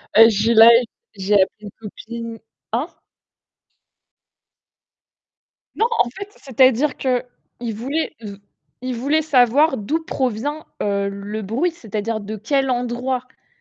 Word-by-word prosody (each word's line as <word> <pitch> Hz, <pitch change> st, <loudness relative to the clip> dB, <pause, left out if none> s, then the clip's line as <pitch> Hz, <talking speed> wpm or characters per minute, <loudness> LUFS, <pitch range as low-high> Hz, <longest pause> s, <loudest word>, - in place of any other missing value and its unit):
Ben 225 Hz, +1 st, +9 dB
je 205 Hz, -, -1 dB
suis 230 Hz, +1 st, +3 dB
là, 225 Hz, +1 st, +9 dB, 0.5 s
j'ai 195 Hz, +1 st, -1 dB
appelé 190 Hz, -1 st, +5 dB
une 205 Hz, -, -8 dB
copine 230 Hz, +1 st, -8 dB, 0.3 s
hein? 250 Hz, +9 st, -1 dB, 2.9 s
Non, 450 Hz, -, +3 dB
en -, -, +3 dB
fait, 395 Hz, +9 st, -8 dB
c'est-à-dire 265 Hz, +1 st, +2 dB
qu'il 245 Hz, -2 st, -4 dB
voulait 280 Hz, +9 st, -3 dB
v 205 Hz, -2 st, -8 dB, 0.5 s
il 255 Hz, -, -2 dB
voulait 285 Hz, +6 st, +1 dB
savoir 275 Hz, 0 st, +3 dB
d'où 310 Hz, +11 st, -2 dB
provient, 270 Hz, +3 st, -3 dB, 0.2 s
heu, 200 Hz, -1 st, 0 dB
le 200 Hz, +2 st, -6 dB
bruit, 240 Hz, -, 0 dB
c'est-à-dire 220 Hz, -6 st, -4 dB
de 215 Hz, +1 st, -6 dB
quel 270 Hz, +5 st, 0 dB
endroit. 245 Hz, +1 st, -1 dB
En 260 Hz, -, -34 dB
240 Hz, 130 wpm, -20 LUFS, 215-270 Hz, 2.9 s, Ben